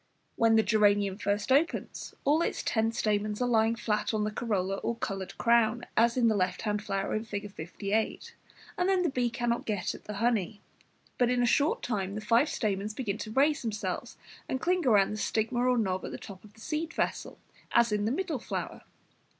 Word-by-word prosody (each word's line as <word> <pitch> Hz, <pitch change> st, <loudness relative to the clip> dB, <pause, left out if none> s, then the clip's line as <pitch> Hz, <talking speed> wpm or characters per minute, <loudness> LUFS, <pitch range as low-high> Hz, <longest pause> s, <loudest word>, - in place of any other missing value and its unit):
When 225 Hz, -1 st, +4 dB
the 220 Hz, -, +5 dB
geranium 205 Hz, -2 st, +2 dB
first 205 Hz, +3 st, -1 dB
opens, 290 Hz, +6 st, 0 dB
all 300 Hz, +4 st, +4 dB
its -, -, -1 dB
ten 225 Hz, 0 st, +1 dB
stamens 210 Hz, -1 st, -1 dB
are 250 Hz, -, +1 dB
lying 225 Hz, -1 st, +3 dB
flat 215 Hz, -1 st, -1 dB
on 210 Hz, -, 0 dB
the 210 Hz, -, -1 dB
corolla 195 Hz, -4 st, -1 dB
or 235 Hz, -, -2 dB
coloured 195 Hz, -5 st, -5 dB
crown, 235 Hz, 0 st, +3 dB
as 235 Hz, +2 st, +3 dB
in 240 Hz, -2 st, +4 dB
the 220 Hz, -, +3 dB
left 185 Hz, -2 st, -1 dB
hand 210 Hz, -1 st, -1 dB
flower 195 Hz, -2 st, -2 dB
in 215 Hz, -, -1 dB
Fig. 205 Hz, -2 st, -5 dB
58, 200 Hz, +5 st, -3 dB, 0.5 s
and 360 Hz, +1 st, +2 dB
then 375 Hz, -2 st, +3 dB
the 340 Hz, -, +1 dB
bee 245 Hz, -2 st, 0 dB
cannot 240 Hz, 0 st, -2 dB
get 205 Hz, -5 st, -1 dB
at -, -, -12 dB
the 210 Hz, -, -5 dB
honey. 215 Hz, -2 st, 0 dB, 0.6 s
But 245 Hz, -1 st, +4 dB
in 245 Hz, 0 st, +2 dB
a -, -, +4 dB
short 285 Hz, +5 st, +2 dB
time 200 Hz, -3 st, -2 dB
five 230 Hz, +7 st, +3 dB
stamens 210 Hz, -1 st, -2 dB
begin 215 Hz, -5 st, -3 dB
to 215 Hz, -, -5 dB
raise 285 Hz, +5 st, +3 dB
themselves 215 Hz, -3 st, -4 dB, 0.3 s
and 260 Hz, -, -1 dB
cling 360 Hz, +5 st, +1 dB
round 210 Hz, -, +3 dB
the -, -, -4 dB
stigma 225 Hz, +3 st, -1 dB
or 250 Hz, 0 st, +3 dB
knob 190 Hz, -4 st, 0 dB
at -, -, -4 dB
the -, -, -6 dB
top 190 Hz, -2 st, -11 dB
of 210 Hz, -1 st, -16 dB
the 220 Hz, -, -17 dB
seed 310 Hz, +5 st, -3 dB
vessel, -, -, -2 dB, 0.3 s
as 235 Hz, -1 st, +4 dB
in 210 Hz, 0 st, 0 dB
the 220 Hz, -, +1 dB
middle 320 Hz, -1 st, -2 dB
flower. -, -, -5 dB
220 Hz, 205 wpm, -29 LUFS, 205-245 Hz, 0.6 s, the